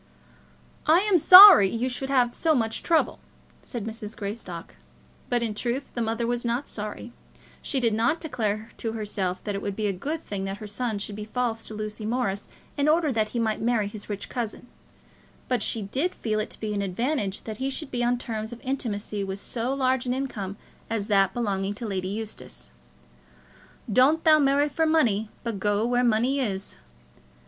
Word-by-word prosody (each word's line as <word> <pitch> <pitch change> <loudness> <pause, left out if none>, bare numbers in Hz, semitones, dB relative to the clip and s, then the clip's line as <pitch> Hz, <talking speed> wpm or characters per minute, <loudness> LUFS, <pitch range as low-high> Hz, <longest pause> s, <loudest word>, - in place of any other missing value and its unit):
"I 325 +4 +6
am 400 -3 +3
sorry 365 - +11
you 230 +5 -1
should 265 +1 -3
have 250 -3 +2
so 320 -2 +2
much 225 -3 0
trouble," 330 -2 +1 0.4
said 235 -5 -6
Mrs. 220 -1 -7
Greystock. 200 -5 -6 0.6
But 240 -1 +1
in 225 -2 -1
truth 240 +5 -3
the 240 - -3
mother 225 +1 -1
was 240 0 -1
not 240 +3 -1
sorry. 215 +3 -5 0.5
She 275 - -1
did 230 -3 +2
not 235 +9 +1
declare 220 -8 -3
to 225 -1 -3
herself 200 -4 -3
that 205 - -3
it 200 - -3
would 200 -1 -3
be 215 - -2
a 200 - +1
good 290 - -4
thing 200 -10 -5
that 195 0 -4
her 215 - -8
son 215 +1 -3
should 205 0 -5
be 210 0 -6
false 225 0 -2
to 215 - -6
Lucy 215 0 -5
Morris 220 -4 -2 0.3
in 285 +1 +1
order 315 -1 +3
that 215 -3 0
he 240 - -5
might 220 -2 0
marry 225 -3 +1
his 205 +1 -8
rich 205 -1 -4
cousin; 240 -2 -5 0.8
but 250 -3 0
she 220 0 0
did 270 - -2
feel 215 -2 -2
it 215 - -3
to - - -8
be 215 -1 -3
an 200 - -1
advantage 200 +1 -2
that 220 -2 -6
he 265 +3 -2
should 275 +1 -5
be 245 -1 -1
on 245 +1 +2
terms 220 -2 -5
of 240 - -8
intimacy 215 -6 -3
with 195 0 -5
so 235 +4 -3
large 260 -2 0
an 250 - 0
income 205 -8 -4 0.3
as 225 -3 -2
that 195 -2 +4
belonging 200 -3 -2
to 230 - -6
Lady 190 -3 -2
Eustace. 195 - -6 1.2
"Doan't 280 +8 +4
thou 310 -2 +6
marry 285 +1 +3
for 320 +2 0
munny, 225 -10 +2
but 230 -4 -3
goa 205 +2 +1
where 245 +1 +1
munny 245 +4 +2
is." 195 -7 -2
225 Hz, 195 wpm, -26 LUFS, 205-255 Hz, 1.2 s, sorry